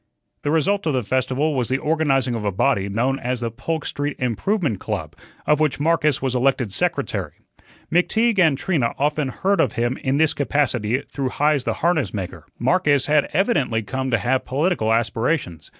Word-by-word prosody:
The -, -, -2 dB
result 165 Hz, +5 st, +1 dB
of 155 Hz, -, +1 dB
the 130 Hz, -2 st, 0 dB
festival 130 Hz, +6 st, 0 dB
was 125 Hz, -4 st, -1 dB
the 130 Hz, -, +1 dB
organizing 135 Hz, -5 st, +1 dB
of 115 Hz, -2 st, -3 dB
a 100 Hz, -, 0 dB
body 100 Hz, +1 st, +1 dB
known 125 Hz, +7 st, 0 dB
as 125 Hz, -1 st, -2 dB
the 115 Hz, -1 st, -2 dB
"Polk 160 Hz, +7 st, -4 dB
Street 145 Hz, 0 st, -3 dB
Improvement 125 Hz, -, -1 dB
Club," -, -, -4 dB, 0.3 s
of 150 Hz, 0 st, +3 dB
which 155 Hz, -3 st, +1 dB
Marcus 150 Hz, -3 st, +1 dB
was 130 Hz, -2 st, 0 dB
elected 125 Hz, -4 st, +1 dB
secretary. -, -, -1 dB, 0.6 s
McTeague 220 Hz, +5 st, +2 dB
and 160 Hz, -6 st, +4 dB
Trina 145 Hz, -9 st, 0 dB
often 150 Hz, 0 st, 0 dB
heard 195 Hz, +10 st, +1 dB
of -, -, +1 dB
him 120 Hz, +2 st, -1 dB
in 135 Hz, +1 st, -1 dB
this 160 Hz, 0 st, +3 dB
capacity 130 Hz, -4 st, 0 dB
through 135 Hz, -2 st, -3 dB
Heise 145 Hz, -1 st, +1 dB
the -, -, 0 dB
harness 160 Hz, -9 st, +1 dB
maker. 95 Hz, -3 st, -6 dB
Marcus 150 Hz, -7 st, +2 dB
had 150 Hz, -1 st, +2 dB
evidently 145 Hz, -, +1 dB
come 130 Hz, +5 st, -3 dB
to 115 Hz, -, +2 dB
have 130 Hz, +4 st, 0 dB
political 140 Hz, -4 st, 0 dB
aspirations. 115 Hz, -, -1 dB
135 Hz, 180 wpm, -22 LUFS, 120-155 Hz, 0.6 s, and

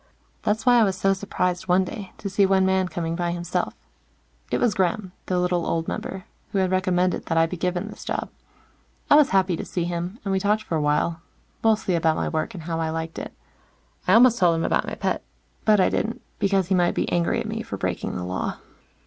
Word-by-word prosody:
That's 220 Hz, +1 st, 0 dB
why 245 Hz, -1 st, +6 dB
I -, -, +6 dB
was 190 Hz, -3 st, 0 dB
so 195 Hz, +1 st, +3 dB
surprised 180 Hz, -2 st, -2 dB
one 180 Hz, +1 st, +4 dB
day, 190 Hz, 0 st, -7 dB
to 205 Hz, -, -5 dB
see 200 Hz, +1 st, +2 dB
one 190 Hz, -1 st, +4 dB
man 190 Hz, 0 st, +2 dB
coming 165 Hz, -2 st, -3 dB
by 175 Hz, 0 st, -1 dB
himself. 175 Hz, -1 st, -2 dB, 0.7 s
It -, -, +1 dB
was 235 Hz, -4 st, +2 dB
Gremm, 190 Hz, +1 st, 0 dB, 0.2 s
the 180 Hz, -, 0 dB
little 180 Hz, -1 st, +1 dB
old 165 Hz, 0 st, -1 dB
member, 190 Hz, 0 st, -5 dB, 0.3 s
who -, -, -1 dB
had 185 Hz, -1 st, +2 dB
recommended 185 Hz, -1 st, +1 dB
that 165 Hz, -, 0 dB
I 165 Hz, -, +5 dB
be 165 Hz, -, -4 dB
given 180 Hz, 0 st, -2 dB
this -, -, -9 dB
job. -, -, -3 dB, 0.8 s
I -, -, +9 dB
was 295 Hz, -2 st, +6 dB
happy 190 Hz, -2 st, +2 dB
to -, -, -5 dB
see 175 Hz, -, -3 dB
him, 175 Hz, +4 st, -3 dB
and 195 Hz, -, -1 dB
we 190 Hz, -, +2 dB
talked 210 Hz, +2 st, +1 dB
for 175 Hz, -, -3 dB
a 155 Hz, -, +1 dB
while, 150 Hz, +3 st, +1 dB, 0.4 s
mostly 220 Hz, -4 st, +2 dB
about 160 Hz, -2 st, +2 dB
my -, -, -1 dB
work, 160 Hz, +3 st, -2 dB
and 170 Hz, -, -7 dB
how 165 Hz, 0 st, -3 dB
I 160 Hz, -1 st, -1 dB
liked 160 Hz, 0 st, -4 dB
it. -, -, -6 dB, 0.8 s
I 185 Hz, -, +5 dB
almost 240 Hz, +1 st, +6 dB
told 175 Hz, -3 st, +4 dB
him 165 Hz, -, -1 dB
about -, -, +1 dB
my -, -, -4 dB
pet, -, -, -2 dB, 0.4 s
but 215 Hz, -2 st, +5 dB
I 185 Hz, -, +4 dB
didn't, 230 Hz, +1 st, -2 dB, 0.2 s
because 195 Hz, -2 st, +1 dB
he -, -, +3 dB
might 175 Hz, -1 st, +2 dB
be -, -, 0 dB
angry 170 Hz, -1 st, +1 dB
at -, -, -3 dB
me -, -, -3 dB
for -, -, -6 dB
breaking -, -, -3 dB
the 90 Hz, -, -3 dB
Law. 90 Hz, +1 st, -3 dB
185 Hz, 230 wpm, -24 LUFS, 170-195 Hz, 0.8 s, I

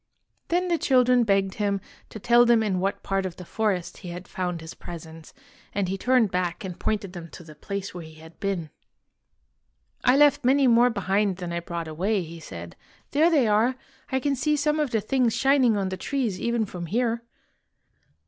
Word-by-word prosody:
Then 360 Hz, +2 st, +1 dB
the 340 Hz, -2 st, +1 dB
children 250 Hz, -2 st, +4 dB
begged 195 Hz, -3 st, +1 dB
him 200 Hz, -1 st, -1 dB, 0.3 s
to -, -, -8 dB
tell 240 Hz, +3 st, +5 dB
them 235 Hz, -2 st, +4 dB
in 190 Hz, -4 st, 0 dB
what 195 Hz, +2 st, -2 dB
part 195 Hz, 0 st, 0 dB
of 185 Hz, -2 st, -5 dB
the 180 Hz, -, -10 dB
forest 200 Hz, -3 st, -1 dB
he 180 Hz, -, -9 dB
had 180 Hz, +1 st, -8 dB
found 180 Hz, -2 st, -3 dB
his 160 Hz, 0 st, -9 dB
presents, 160 Hz, -2 st, -10 dB, 0.4 s
and 200 Hz, -2 st, 0 dB
he 190 Hz, -, -2 dB
turned 245 Hz, 0 st, +2 dB
back 180 Hz, 0 st, -2 dB
and 180 Hz, -2 st, -7 dB
pointed 205 Hz, -4 st, -2 dB
them 170 Hz, -2 st, -8 dB
to 170 Hz, -, -11 dB
the 155 Hz, -2 st, -12 dB
place 195 Hz, +6 st, -5 dB
where 175 Hz, -, -7 dB
he 160 Hz, 0 st, -12 dB
had 160 Hz, +1 st, -15 dB
been. 185 Hz, -6 st, -2 dB, 0.7 s
" 60 Hz, -2 st, -43 dB
I 250 Hz, +2 st, +5 dB
left 290 Hz, -1 st, +5 dB
many 270 Hz, +2 st, +4 dB
more 240 Hz, 0 st, +5 dB
behind 200 Hz, -2 st, 0 dB
than 175 Hz, -2 st, -5 dB
I 170 Hz, -, -1 dB
brought 170 Hz, -1 st, -5 dB
away," 185 Hz, +6 st, -1 dB
he 165 Hz, +1 st, -9 dB
said. 85 Hz, -, -9 dB, 0.4 s
''There 310 Hz, +4 st, +4 dB
they 290 Hz, -8 st, +3 dB
are! 220 Hz, +5 st, +3 dB, 0.4 s
I 265 Hz, -, +1 dB
can 280 Hz, +1 st, 0 dB
see 300 Hz, +4 st, +1 dB
some 300 Hz, +1 st, +1 dB
of 300 Hz, -3 st, +1 dB
the 225 Hz, -2 st, 0 dB
things 245 Hz, +1 st, +1 dB
shining 265 Hz, -5 st, +3 dB
on 195 Hz, -1 st, -1 dB
the 185 Hz, -, -4 dB
trees 235 Hz, -4 st, -2 dB
even 235 Hz, -1 st, 0 dB
from 175 Hz, -3 st, -7 dB
here." 230 Hz, +3 st, 0 dB
200 Hz, 205 wpm, -25 LUFS, 175-245 Hz, 0.7 s, tell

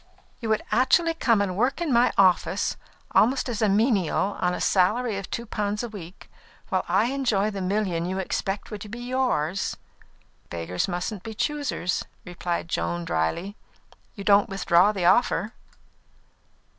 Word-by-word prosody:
"You 230 Hz, -, -4 dB
would 220 Hz, -, +1 dB
actually 330 Hz, +7 st, +3 dB
come 230 Hz, -9 st, +2 dB
and 185 Hz, -2 st, -3 dB
work 250 Hz, -, +1 dB
in 330 Hz, -6 st, 0 dB
my 240 Hz, +1 st, +4 dB
office, 185 Hz, -2 st, +3 dB, 0.4 s
almost 255 Hz, +4 st, +3 dB
as 235 Hz, -3 st, -3 dB
a 215 Hz, -, +3 dB
menial, 205 Hz, -, +1 dB
on 180 Hz, -, +2 dB
a -, -, -5 dB
salary 215 Hz, +5 st, +2 dB
of 195 Hz, -, -8 dB
two 235 Hz, -, -4 dB
pounds 210 Hz, 0 st, -2 dB
a 240 Hz, -, -4 dB
week, 185 Hz, -4 st, -10 dB, 0.4 s
while 190 Hz, -4 st, 0 dB
I 200 Hz, +8 st, +2 dB
enjoy 220 Hz, -7 st, +1 dB
the 200 Hz, -1 st, -5 dB
million 185 Hz, -3 st, -1 dB
you 190 Hz, +1 st, -3 dB
expected 195 Hz, +2 st, -3 dB
would -, -, -10 dB
be 230 Hz, -, -7 dB
yours?" 240 Hz, -, -1 dB, 0.7 s
"Beggars 85 Hz, +1 st, -2 dB
mustn't 180 Hz, +2 st, -3 dB
be 220 Hz, +3 st, -8 dB
choosers," 285 Hz, -, -1 dB, 0.2 s
returned 175 Hz, -1 st, -3 dB
Joan, 85 Hz, -, -2 dB
drily. 85 Hz, -, -1 dB, 0.6 s
"You 200 Hz, -, -7 dB
don't 200 Hz, 0 st, +4 dB
withdraw 195 Hz, 0 st, +3 dB
the 190 Hz, -4 st, -2 dB
offer?" 215 Hz, +1 st, +3 dB
200 Hz, 155 wpm, -25 LUFS, 180-235 Hz, 0.7 s, my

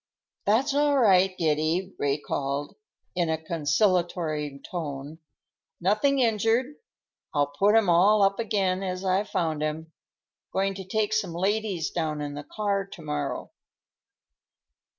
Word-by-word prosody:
"That's 235 Hz, +7 st, +3 dB
all 290 Hz, 0 st, +3 dB
right, 190 Hz, -6 st, +4 dB
Giddy," 160 Hz, +4 st, 0 dB
Ray 140 Hz, 0 st, +1 dB
called 140 Hz, -1 st, -3 dB, 0.4 s
in 175 Hz, -2 st, +1 dB
a 160 Hz, -, +1 dB
conciliatory 160 Hz, -2 st, 0 dB
tone. 150 Hz, -2 st, -5 dB, 0.6 s
"Nothing 215 Hz, +10 st, +2 dB
injured. 230 Hz, +2 st, +2 dB, 0.6 s
I'll 145 Hz, -1 st, +4 dB
put 205 Hz, +2 st, +5 dB
'em 225 Hz, -3 st, +4 dB
all 195 Hz, +5 st, +5 dB
up 195 Hz, +2 st, +2 dB
again 195 Hz, -4 st, 0 dB
as 185 Hz, 0 st, -3 dB
I 190 Hz, +2 st, +2 dB
found 160 Hz, -6 st, -2 dB
'em. 155 Hz, +1 st, -3 dB, 0.6 s
Going 195 Hz, +1 st, +1 dB
to 190 Hz, 0 st, -7 dB
take 215 Hz, +2 st, 0 dB
some 200 Hz, -5 st, 0 dB
ladies 195 Hz, -3 st, -1 dB
down 155 Hz, -3 st, -2 dB
in 145 Hz, -1 st, -4 dB
the 145 Hz, +1 st, -6 dB
car 200 Hz, 0 st, -1 dB
to 185 Hz, -, -11 dB
morrow." 145 Hz, -2 st, -3 dB
185 Hz, 130 wpm, -26 LUFS, 155-210 Hz, 0.6 s, put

